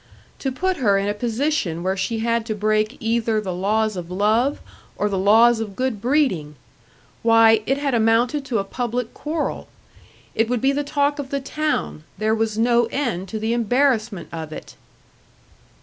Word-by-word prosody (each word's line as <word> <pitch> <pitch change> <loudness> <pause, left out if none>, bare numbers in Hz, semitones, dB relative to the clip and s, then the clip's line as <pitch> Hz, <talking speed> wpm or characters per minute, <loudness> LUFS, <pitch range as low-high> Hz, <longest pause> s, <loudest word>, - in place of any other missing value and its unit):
To 270 - -2
put 370 +8 -1
her 205 -8 +3
in 195 +1 -1
a 205 - 0
position 225 - -1
where 190 +1 0
she 220 +4 -2
had 230 0 +1
to 215 - -2
break 215 +3 0
either 225 -2 0
the 190 -4 -4
laws 215 +4 0
of 175 -2 -6
love 215 +9 +1 0.4
or 210 - +1
the 195 - -1
laws 225 +4 +5
of 210 -3 -5
good 255 -4 -2
breeding! 240 - +1 0.7
Why, 225 -1 +5
it 270 - +1
had 280 -2 -1
amounted 235 +5 +2
to 255 -5 -1
a 200 - 0
public 240 +3 -3
quarrel. 305 +1 -3 0.7
It 225 0 +1
would 250 -1 0
be 270 +4 +2
the 290 +1 -1
talk 290 0 0
of 275 -2 -5
the 280 - -1
town 300 - -2
there 215 +2 +1
was 220 -1 -1
no 235 +1 +3
end 230 -7 -2
to 220 - -4
the 220 +2 -1
embarrassment 235 -4 +1
of 160 -2 -6
it! - - -9
225 Hz, 180 wpm, -22 LUFS, 210-260 Hz, 0.7 s, laws